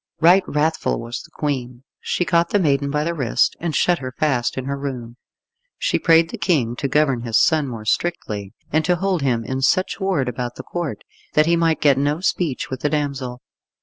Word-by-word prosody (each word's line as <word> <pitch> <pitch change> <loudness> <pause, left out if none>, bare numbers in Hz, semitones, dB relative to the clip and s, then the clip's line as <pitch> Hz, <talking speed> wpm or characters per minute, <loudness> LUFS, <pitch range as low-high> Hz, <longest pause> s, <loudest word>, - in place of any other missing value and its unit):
Right 180 +4 +6
wrathful 155 +2 0
was 115 +1 -5
the - - -15
Queen. 125 -4 -4 0.2
She 175 - -1
caught 170 -1 +2
the - - +2
maiden 140 -6 +1
by 150 +1 0
the 170 +2 -1
wrist, 135 -8 +1
and 165 -3 -2
shut 175 +4 +2
her 130 -1 -5
fast 130 -6 0
in 130 - -3
her 140 +1 -2
room. 125 -4 -6 0.6
She - - 0
prayed 165 -1 +4
the - - -7
King 130 -10 +1
to 140 - -1
govern 140 -3 +2
his 115 -2 +1
son 155 -3 +3
more 115 -4 -7
strictly, 105 - -2 0.2
and 155 +1 +3
to 180 - +3
hold 185 -1 0
him 120 -4 0
in 130 +2 -3
such 185 +10 +1
ward 190 -9 0
about 120 0 -4
the - - -8
Court 160 -12 -4 0.3
that 155 - +5
he 170 +1 +3
might 165 -1 +1
get 140 -2 +4
no 145 +3 0
speech 175 -6 -1
with 130 - -3
the 150 - 0
damsel. 135 -4 -3
145 Hz, 210 wpm, -21 LUFS, 125-165 Hz, 0.6 s, Right